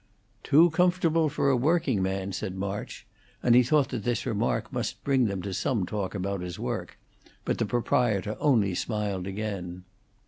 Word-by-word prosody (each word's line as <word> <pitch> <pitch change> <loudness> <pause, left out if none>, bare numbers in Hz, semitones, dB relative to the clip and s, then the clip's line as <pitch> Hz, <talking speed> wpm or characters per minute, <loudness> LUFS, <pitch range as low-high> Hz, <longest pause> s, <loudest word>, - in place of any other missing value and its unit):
"Too 160 +7 +5
comfortable 165 -2 +2
for 140 -1 +1
a - - +3
working 140 - +1
man," 95 +1 -2
said 95 0 -4
March, 100 +1 -5 0.4
and 120 - +4
he 125 - +7
thought 140 +3 +2
that 120 -5 -4
this 120 -2 -1
remark - - -1
must - - -3
bring 135 -3 +2
them 100 -4 -2
to 100 - -4
some 110 0 0
talk 100 0 -4
about 100 -1 -2
his 90 -1 -6
work, - - -4 0.5
but - - -1
the - - 0
proprietor 110 -3 +1
only 110 -10 +3
smiled 100 -2 -2
again. 95 -3 -5
105 Hz, 170 wpm, -27 LUFS, 95-135 Hz, 0.5 s, he